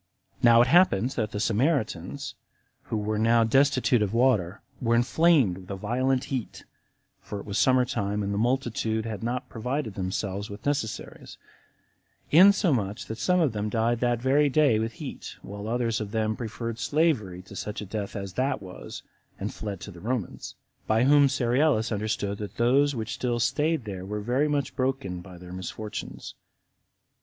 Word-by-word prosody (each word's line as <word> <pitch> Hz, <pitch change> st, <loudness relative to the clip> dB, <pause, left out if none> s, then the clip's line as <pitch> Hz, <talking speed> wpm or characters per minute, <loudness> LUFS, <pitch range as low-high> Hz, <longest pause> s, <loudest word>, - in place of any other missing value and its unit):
Now 120 Hz, -1 st, +7 dB
it -, -, -1 dB
happened 130 Hz, -, +4 dB
that 110 Hz, -6 st, -2 dB
the 105 Hz, -, -4 dB
Samaritans, 125 Hz, -, -1 dB, 0.5 s
who 110 Hz, -, -2 dB
were 105 Hz, 0 st, -1 dB
now 115 Hz, +1 st, +4 dB
destitute 130 Hz, 0 st, +3 dB
of 105 Hz, +1 st, 0 dB
water, 110 Hz, -7 st, +2 dB, 0.2 s
were 115 Hz, -1 st, +2 dB
inflamed 125 Hz, -, +3 dB
with 95 Hz, -, -14 dB
a 100 Hz, -, -3 dB
violent 125 Hz, +6 st, 0 dB
heat, 125 Hz, -4 st, -4 dB, 0.5 s
[for 105 Hz, -, -7 dB
it -, -, -9 dB
was 100 Hz, 0 st, -2 dB
summer 130 Hz, -1 st, +4 dB
time, 105 Hz, -3 st, -2 dB
and 100 Hz, 0 st, -2 dB
the -, -, -2 dB
multitude 115 Hz, -2 st, 0 dB
had 110 Hz, -3 st, -5 dB
not 120 Hz, +2 st, -3 dB
provided 125 Hz, 0 st, -3 dB
themselves 95 Hz, +2 st, -3 dB
with 100 Hz, 0 st, -10 dB
necessaries,] 140 Hz, -7 st, -3 dB, 0.9 s
insomuch 155 Hz, -, +4 dB
that 110 Hz, -, -6 dB
some 180 Hz, 0 st, +2 dB
of 150 Hz, -9 st, +2 dB
them 105 Hz, 0 st, -2 dB
died 115 Hz, +2 st, +1 dB
that 120 Hz, -1 st, +1 dB
very 140 Hz, +4 st, +3 dB
day 140 Hz, -6 st, +3 dB
with 115 Hz, +1 st, -2 dB
heat, -, -, -8 dB
while 100 Hz, +1 st, -7 dB
others 115 Hz, -1 st, 0 dB
of 105 Hz, -, -4 dB
them 110 Hz, 0 st, -1 dB
preferred 115 Hz, 0 st, -5 dB
slavery 110 Hz, -, +1 dB
before 95 Hz, +2 st, -11 dB
such 105 Hz, -, -4 dB
a 105 Hz, -, -5 dB
death 100 Hz, +1 st, -5 dB
as 100 Hz, -2 st, -5 dB
that 130 Hz, +4 st, 0 dB
was, 95 Hz, -2 st, -9 dB, 0.4 s
and -, -, -4 dB
fled 100 Hz, -3 st, -5 dB
to 100 Hz, -, -8 dB
the 90 Hz, -, -12 dB
Romans; 115 Hz, -3 st, -4 dB, 0.3 s
by 110 Hz, +2 st, +3 dB
whom 145 Hz, +1 st, +6 dB
Cerealis 125 Hz, -2 st, +2 dB
understood 105 Hz, -1 st, -2 dB
that 105 Hz, -1 st, -7 dB
those 135 Hz, +4 st, +3 dB
which 110 Hz, -1 st, -3 dB
still 120 Hz, -2 st, -1 dB
staid 150 Hz, +3 st, +1 dB
there 95 Hz, -3 st, -6 dB
were 105 Hz, +2 st, -4 dB
very 125 Hz, +8 st, +1 dB
much 145 Hz, -2 st, -1 dB
broken 130 Hz, -9 st, -2 dB
by 90 Hz, 0 st, -12 dB
their 90 Hz, 0 st, -10 dB
misfortunes. 100 Hz, +4 st, -6 dB
115 Hz, 170 wpm, -27 LUFS, 105-130 Hz, 0.9 s, Now